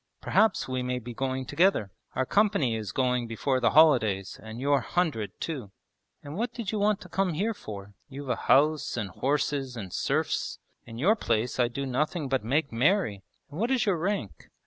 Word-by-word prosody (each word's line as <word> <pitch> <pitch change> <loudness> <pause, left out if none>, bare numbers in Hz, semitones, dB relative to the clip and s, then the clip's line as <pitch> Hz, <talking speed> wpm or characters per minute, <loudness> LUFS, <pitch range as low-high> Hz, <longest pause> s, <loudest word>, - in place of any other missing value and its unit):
'Perhaps 220 0 +2
we 130 -1 -2
may 125 0 -1
be 120 0 -7
going 130 +1 -2
together. 145 - +2 0.2
Our 130 - +1
company 200 - +2
is 110 -3 -4
going 125 -2 0
before 130 +4 0
the 120 -2 +3
holidays, 115 -10 +4
and 110 +1 -8
your 140 0 +2
"hundred" 155 - -1
too.' 135 -11 -4 0.5
'And 145 +1 -7
what 230 +4 -1
did 235 -5 -4
you 215 - -1
want 210 0 +2
to - - -10
come 190 -3 0
here 210 +8 0
for? 100 - -9 0.2
You've 140 0 -7
a - - +2
house 150 0 +2
and 105 -5 -3
horses 135 +1 -1
and 95 -5 -7
serfs. - - -1 0.3
In 115 -1 -9
your 190 - +4
place 120 - -1
I'd 120 -1 +2
do 140 +2 -3
nothing 145 +3 -1
but 135 -4 0
make 140 +6 0
merry! 125 - +2 0.3
And 150 - -7
what 230 +3 +1
is 260 -4 +2
your 195 -4 +2
rank?' 165 - -3
135 Hz, 190 wpm, -28 LUFS, 120-170 Hz, 0.5 s, holidays